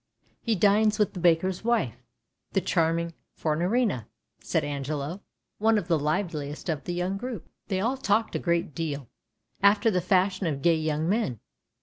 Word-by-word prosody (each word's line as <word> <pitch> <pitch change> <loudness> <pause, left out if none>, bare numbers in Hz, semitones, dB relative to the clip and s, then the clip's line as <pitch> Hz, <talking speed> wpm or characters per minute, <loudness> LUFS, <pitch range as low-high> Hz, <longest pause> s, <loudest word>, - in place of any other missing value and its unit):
" - - -36
He 230 -2 +1
dines 210 +3 +4
with 210 -2 +1
the 180 - -6
baker's 175 +3 +2
wife, 210 - 0 0.5
the 195 - +3
charming 170 -2 +1 0.2
Fornarina," 175 - 0 0.3
said - - 0
Angelo, 145 +5 -3 0.4
one 220 +1 +4
of 180 - -2
the 165 -3 +2
liveliest 150 -1 -2
of 150 -3 -2
the 175 - -2
young 180 +2 -1
group. 240 -4 -6 0.2
They 190 - 0
all 245 +6 0
talked 220 -2 +1
a - - +1
great 170 -3 0
deal, 145 -4 -4 0.5
after 205 +3 +5
the 180 -2 +1
fashion 185 0 +2
of 140 -4 -3
gay 170 -1 +5
young 155 0 -1
men. 190 - 0
175 Hz, 165 wpm, -27 LUFS, 155-205 Hz, 0.5 s, after